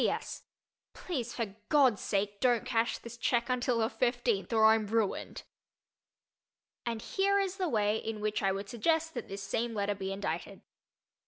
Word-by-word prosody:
P. -, -, +3 dB
P. -, -, +3 dB
S. -, -, -4 dB, 0.5 s
Please 255 Hz, -10 st, -4 dB
for 215 Hz, -5 st, -3 dB
God's 265 Hz, -8 st, +4 dB
sake 205 Hz, 0 st, -1 dB
don't 245 Hz, -2 st, +2 dB
cash 235 Hz, -2 st, +1 dB
this 235 Hz, 0 st, -10 dB
check 235 Hz, 0 st, +1 dB
until 250 Hz, -1 st, +1 dB
the 220 Hz, -1 st, +2 dB
fifteenth 240 Hz, -5 st, 0 dB
or 220 Hz, -1 st, +5 dB
I'm 220 Hz, -1 st, +5 dB
ruined. 220 Hz, -1 st, -1 dB, 1.4 s
And 230 Hz, -1 st, -2 dB
here 400 Hz, +1 st, +2 dB
is 390 Hz, -1 st, 0 dB
the 370 Hz, -4 st, 0 dB
way 210 Hz, -3 st, +2 dB
in 220 Hz, -1 st, -4 dB
which 210 Hz, 0 st, -1 dB
I 195 Hz, -1 st, +2 dB
would 195 Hz, +1 st, -4 dB
suggest 320 Hz, +9 st, 0 dB
that 240 Hz, -, -5 dB
this 195 Hz, 0 st, -6 dB
same 230 Hz, +3 st, -2 dB
letter 205 Hz, 0 st, 0 dB
be 195 Hz, -1 st, -4 dB
indited. 195 Hz, +1 st, -4 dB
230 Hz, 175 wpm, -31 LUFS, 205-250 Hz, 1.4 s, or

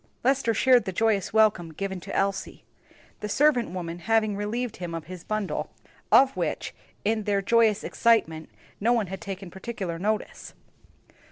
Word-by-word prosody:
Lester 260 Hz, -3 st, +2 dB
shared 255 Hz, -2 st, +4 dB
the 190 Hz, -, -2 dB
joyous 210 Hz, 0 st, +1 dB
welcome 210 Hz, -6 st, +3 dB
given 190 Hz, +3 st, -4 dB
to 195 Hz, +3 st, -7 dB
Elsie; 195 Hz, 0 st, -2 dB, 0.6 s
the 210 Hz, -, -5 dB
servant 275 Hz, 0 st, +3 dB
woman 175 Hz, -1 st, -5 dB
having 220 Hz, +1 st, +1 dB
relieved 220 Hz, +4 st, -3 dB
him 175 Hz, -2 st, -5 dB
of 165 Hz, -, -6 dB
his 180 Hz, 0 st, -9 dB
bundle, 215 Hz, -2 st, -3 dB, 0.4 s
of 270 Hz, 0 st, +6 dB
which, -, -, -3 dB, 0.3 s
in 215 Hz, 0 st, 0 dB
their 205 Hz, -1 st, +1 dB
joyous 220 Hz, -1 st, +3 dB
excitement, 175 Hz, -9 st, +1 dB, 0.3 s
no 230 Hz, +4 st, +3 dB
one 230 Hz, -3 st, +1 dB
had 190 Hz, -, -6 dB
taken 190 Hz, 0 st, -7 dB
particular 190 Hz, -4 st, -5 dB
notice. 210 Hz, +3 st, -3 dB
205 Hz, 155 wpm, -26 LUFS, 185-230 Hz, 0.6 s, of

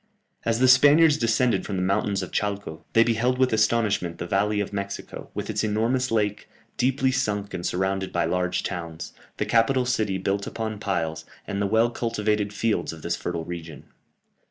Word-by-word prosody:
As 115 Hz, -1 st, +1 dB
the 130 Hz, +2 st, +4 dB
Spaniards 145 Hz, +4 st, +7 dB
descended 115 Hz, +1 st, +2 dB
from 100 Hz, -, -4 dB
the 90 Hz, -, -1 dB
mountains 100 Hz, +1 st, 0 dB
of -, -, -7 dB
Chalco, 100 Hz, -6 st, -3 dB
they 115 Hz, -, +6 dB
beheld 120 Hz, +2 st, +1 dB
with 130 Hz, -2 st, +2 dB
astonishment 110 Hz, -6 st, +1 dB
the -, -, -4 dB
valley 105 Hz, +3 st, +1 dB
of 105 Hz, 0 st, -3 dB
Mexico, 100 Hz, 0 st, -5 dB
with -, -, -3 dB
its -, -, -1 dB
enormous 115 Hz, +5 st, +1 dB
lake, 105 Hz, -2 st, -1 dB, 0.3 s
deeply 130 Hz, 0 st, +1 dB
sunk 105 Hz, -6 st, -1 dB
and 85 Hz, -, -4 dB
surrounded 95 Hz, +2 st, -1 dB
by 85 Hz, -, +1 dB
large 90 Hz, -1 st, 0 dB
towns, 85 Hz, -4 st, -5 dB, 0.2 s
the -, -, -1 dB
capital 125 Hz, +3 st, +3 dB
city 110 Hz, -6 st, 0 dB
built 100 Hz, +1 st, -2 dB
upon 110 Hz, -2 st, -4 dB
piles, 80 Hz, -6 st, -2 dB, 0.2 s
and 100 Hz, 0 st, -3 dB
the 100 Hz, -, +1 dB
well 110 Hz, +3 st, +3 dB
cultivated 105 Hz, -3 st, -1 dB
fields 110 Hz, +1 st, -1 dB
of 80 Hz, -1 st, -11 dB
this 85 Hz, 0 st, -1 dB
fertile 85 Hz, -2 st, -4 dB
region. 85 Hz, -3 st, -8 dB
105 Hz, 180 wpm, -25 LUFS, 95-115 Hz, 0.3 s, Spaniards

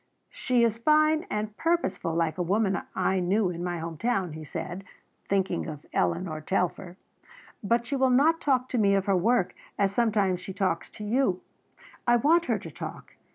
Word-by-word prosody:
"She 250 Hz, -2 st, +1 dB
is 230 Hz, -1 st, +1 dB
fine 310 Hz, +6 st, +3 dB
and 210 Hz, 0 st, -3 dB
purposeful 260 Hz, -, 0 dB
like 165 Hz, +1 st, 0 dB
a -, -, +2 dB
woman 195 Hz, +1 st, +1 dB
I 190 Hz, 0 st, +1 dB
knew 185 Hz, +2 st, +1 dB
in 175 Hz, 0 st, -5 dB
my 175 Hz, -1 st, -2 dB
home 165 Hz, -1 st, -6 dB
town," 195 Hz, -8 st, 0 dB
he 155 Hz, 0 st, -8 dB
said, 170 Hz, +4 st, -6 dB, 0.5 s
thinking 190 Hz, -3 st, 0 dB
of 150 Hz, -2 st, -8 dB
Eleanor 170 Hz, -3 st, -1 dB
Telfer, 180 Hz, +1 st, -2 dB, 0.7 s
"but 235 Hz, +3 st, +1 dB
she 275 Hz, -, -2 dB
will 265 Hz, -1 st, +3 dB
not 305 Hz, +6 st, +4 dB
talk 255 Hz, -3 st, +1 dB
to 245 Hz, -, 0 dB
me 200 Hz, -2 st, +4 dB
of 195 Hz, -1 st, +1 dB
her 195 Hz, -, +2 dB
work 195 Hz, +2 st, +2 dB, 0.2 s
as 200 Hz, -1 st, +2 dB
sometimes 205 Hz, -5 st, +1 dB
she 190 Hz, +1 st, -7 dB
talks 185 Hz, -4 st, -1 dB
to 210 Hz, -, -10 dB
you. 210 Hz, -4 st, +1 dB, 0.7 s
I 240 Hz, -, +6 dB
want 325 Hz, +8 st, +3 dB
her -, -, +1 dB
to -, -, -9 dB
talk. -, -, -8 dB
200 Hz, 185 wpm, -27 LUFS, 180-240 Hz, 0.7 s, I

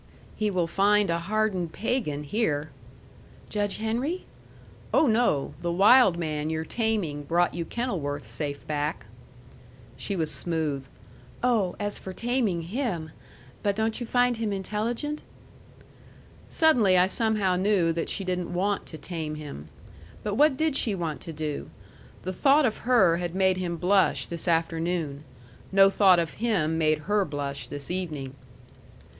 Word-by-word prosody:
"He 215 Hz, -1 st, 0 dB
will 185 Hz, -4 st, +1 dB
find 200 Hz, +2 st, +3 dB
a 170 Hz, -, 0 dB
hardened 190 Hz, -2 st, -1 dB
pagan 205 Hz, -, -2 dB
here." 150 Hz, -, -1 dB, 0.8 s
"Judge 205 Hz, -1 st, -1 dB
Henry?" 245 Hz, +11 st, -2 dB, 0.7 s
"Oh, -, -, +4 dB
no! 220 Hz, -, +2 dB
The 170 Hz, 0 st, -1 dB
wild 195 Hz, +1 st, +6 dB
man 155 Hz, -2 st, -2 dB
you're 160 Hz, 0 st, -2 dB
taming 210 Hz, -9 st, -1 dB
brought 170 Hz, +4 st, +1 dB
you 170 Hz, -1 st, -3 dB
Kenilworth 160 Hz, -, -3 dB
safe 145 Hz, -2 st, -4 dB
back." 150 Hz, -4 st, -2 dB, 0.9 s
She 195 Hz, +9 st, -3 dB
was 160 Hz, -4 st, +1 dB
smooth. 155 Hz, -5 st, -1 dB, 0.6 s
"Oh, 220 Hz, -8 st, +2 dB
as 205 Hz, 0 st, -2 dB
for 190 Hz, -, -7 dB
taming 230 Hz, -7 st, 0 dB
him! 180 Hz, -, -3 dB, 0.5 s
But 200 Hz, -1 st, 0 dB
don't 220 Hz, +2 st, -1 dB
you 240 Hz, -, -5 dB
find 245 Hz, 0 st, +2 dB
him 220 Hz, -2 st, -1 dB
intelligent?" 225 Hz, +9 st, -2 dB, 1.3 s
Suddenly 240 Hz, -, +4 dB
I 180 Hz, -, +6 dB
somehow 205 Hz, -2 st, +1 dB
knew 185 Hz, -3 st, +2 dB
that 165 Hz, 0 st, -3 dB
she 195 Hz, -, -2 dB
didn't 180 Hz, -1 st, -2 dB
want 195 Hz, +3 st, -1 dB
to 160 Hz, -, -7 dB
tame 160 Hz, -3 st, -5 dB
him. 145 Hz, -, -8 dB, 0.6 s
But 210 Hz, -, -2 dB
what 290 Hz, +4 st, +4 dB
did 315 Hz, -2 st, +1 dB
she 220 Hz, -6 st, +1 dB
want 165 Hz, -4 st, -3 dB
to 165 Hz, -, -6 dB
do? 150 Hz, -2 st, -4 dB, 0.5 s
The 185 Hz, -, -3 dB
thought 280 Hz, +9 st, +4 dB
of 225 Hz, -, 0 dB
her 190 Hz, -9 st, +5 dB
had 175 Hz, 0 st, -4 dB
made 190 Hz, -1 st, +3 dB
him 175 Hz, -2 st, -3 dB
blush 190 Hz, +3 st, +2 dB
this 170 Hz, +1 st, -6 dB
afternoon. 165 Hz, -3 st, 0 dB, 0.5 s
No 195 Hz, 0 st, +6 dB
thought 190 Hz, -3 st, +5 dB
of 165 Hz, -2 st, -1 dB
him 165 Hz, -9 st, +1 dB
made 155 Hz, -1 st, +2 dB
her 210 Hz, 0 st, +2 dB
blush 145 Hz, -4 st, -4 dB
this 145 Hz, +2 st, -6 dB
evening. 155 Hz, -8 st, -4 dB
185 Hz, 150 wpm, -27 LUFS, 160-215 Hz, 1.3 s, wild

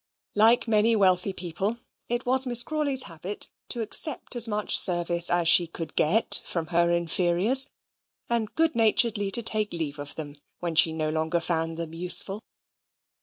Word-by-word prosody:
Like 225 Hz, +3 st, +3 dB
many 225 Hz, +1 st, +2 dB
wealthy 185 Hz, -2 st, +1 dB
people, 190 Hz, +5 st, -5 dB, 0.3 s
it 240 Hz, +1 st, -3 dB
was 260 Hz, +1 st, +2 dB
Miss 240 Hz, -1 st, +5 dB
Crawley's 290 Hz, -3 st, +1 dB
habit 175 Hz, +5 st, -8 dB, 0.2 s
to 235 Hz, -, -3 dB
accept 255 Hz, +5 st, +1 dB
as 235 Hz, -1 st, +1 dB
much 210 Hz, -1 st, -2 dB
service 175 Hz, -1 st, +1 dB
as 175 Hz, -1 st, 0 dB
she 170 Hz, +1 st, +5 dB
could 165 Hz, -1 st, -9 dB
get 200 Hz, +9 st, +2 dB
from 170 Hz, -2 st, -4 dB
her 170 Hz, 0 st, +2 dB
inferiors; 175 Hz, -, +3 dB, 0.6 s
and 230 Hz, -2 st, -3 dB
good 325 Hz, 0 st, +1 dB
naturedly 220 Hz, -2 st, +2 dB
to 235 Hz, +4 st, +3 dB
take 215 Hz, -1 st, 0 dB
leave 155 Hz, -4 st, -5 dB
of 145 Hz, 0 st, -8 dB
them 145 Hz, -2 st, -8 dB, 0.2 s
when 170 Hz, -2 st, -4 dB
she 160 Hz, 0 st, +4 dB
no 155 Hz, -1 st, -3 dB
longer 160 Hz, +2 st, -2 dB
found 165 Hz, -1 st, -2 dB
them 165 Hz, -1 st, -5 dB
useful. 180 Hz, +4 st, -1 dB
190 Hz, 165 wpm, -25 LUFS, 170-230 Hz, 0.6 s, Miss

